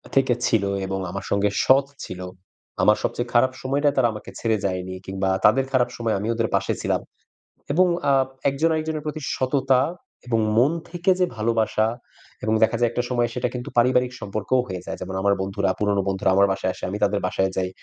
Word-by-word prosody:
থেকে 135 -2 +4
ছিল 110 -3 +2 0.2
এবং 95 0 -3
আমার 100 - -5
সঙ্গে 100 +1 +2 0.2
সৎ 135 +1 +5 0.2
ছিল। 90 0 -7 0.6
আমার - - +5
সবচেয়ে 120 0 -2
খারাপ 125 +2 +4
সময়টা 140 +3 +1
তারা 130 -3 +5
আমাকে 105 - -9
ছেড়ে 110 -1 +1
যায়নি, 95 -1 -3
কিংবা 95 0 -2 0.2
তাদের 130 +5 +5
খারাপ 130 -2 +2
সময়ে 115 -2 0
আমি 105 - -3
ওদের 115 0 0
পাশে - - 0
ছিলাম। - - 0 0.7
এবং 180 +4 +4 0.2
আ - - +5 0.4
একজন 145 +4 +1
আরেকজনের 155 -1 -2
প্রতি 155 0 -4
সততা 130 0 +2 0.5
এবং 115 -2 +1 0.2
মন 130 +6 +5 0.2
থেকে 175 +2 +1
যে 180 - +4
ভালোবাসা 110 0 +1 0.6
এবং 110 - +1
দেখা 115 +1 +2
যায় 120 -1 +3
একটা 120 - -1
সময় 120 -1 +1
সেটা 125 0 -1
কিন্তু 125 -1 -5
পারিবারিক 125 +1 +3
সম্পর্কও 110 +5 -1
হয়ে 90 -3 -5
যায়। - - -5
যেমন 95 +1 -5
আমার 100 +1 +3
বন্ধুরা, 95 0 -1
পুরনো 100 -1 +1
বন্ধুরা 95 0 0
আমার 100 +1 +5
বাসায় 95 -1 -1
আসে, - - -15
আমি 100 - -3
তাদের 100 0 +2
বাসায় 95 0 0
যাই 95 -1 0
115 Hz, 190 wpm, -23 LUFS, 100-130 Hz, 0.7 s, সৎ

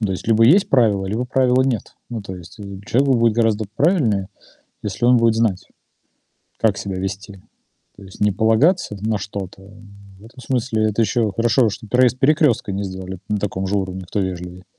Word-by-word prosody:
Ну, 105 - 0
то 95 - -2
есть 95 - -6
либо 115 0 +4
есть 175 - +5
правило, 105 -7 +2
либо 110 +6 -2
правила 130 0 +2
нет. 125 -5 -3
Ну, 115 -2 -4
то 95 -1 -7
есть, 90 +5 -13
э, - - -9 0.2
человеку 135 +2 +2
будет 115 -2 +2
гораздо 110 -2 +1
правильнее, 120 - +1 0.6
если 105 +3 -2
он 125 0 +5
будет 115 -1 +3
знать, 110 -5 0 0.9
как 105 -3 +1
себя 95 -2 -4
вести. 95 +1 -6 0.6
То 100 - -14
есть 95 -1 -14
не 105 0 +3
полагаться 110 - +2
на 110 0 -1
что-то. 95 -2 -7 0.6
В 105 - -17
этом 120 +3 -14
смысле 115 -3 -1
это 115 +3 0
еще 110 -1 +1
хорошо, 115 +2 +2
что 110 +1 -7
проезд 125 +2 +2
перекрестка 145 -7 +2
не 100 +1 -3
сделали 95 -1 -6
на 105 - 0
таком 95 -1 -3
же 100 +2 0
уровне, 95 -1 -4
кто 100 - -2
вежливее. 90 0 -5
110 Hz, 190 wpm, -20 LUFS, 95-120 Hz, 0.9 s, есть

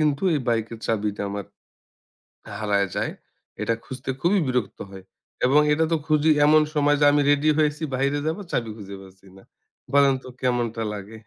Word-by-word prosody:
কিন্তু 150 +1 +1
এই 145 - 0
বাইকের 115 0 -1
চাবিটা 105 -2 -1
আমার 100 0 -5 1.2
হারায় 100 -2 +1
যায়। - - -1 0.5
এটা 115 +2 +1
খুঁজতে 130 +1 -8
খুবই 190 +4 +3
বিরক্ত 125 -6 -2
হয়। 95 -1 -11 0.4
এবং 140 +4 +5
এটা 160 +2 +2
তো - - +4
খুঁজি 155 0 +3 0.2
এমন 155 +1 +6
সময় 145 -1 +3
যে, 145 - +4
আমি 145 - +3
রেডি 145 +2 +3
হয়েছি 150 +1 +1
বাইরে 140 +3 0
যাব 160 +3 -1
চাবি 115 -2 -1
খুঁজে 100 -2 -9
পাচ্ছিনা 95 0 -17
না। 95 - -16 0.5
বলেন 140 -1 +5
তো - - -11
কেমনটা 120 -3 -1
লাগে? 105 +2 -8
125 Hz, 170 wpm, -24 LUFS, 105-145 Hz, 1.2 s, এমন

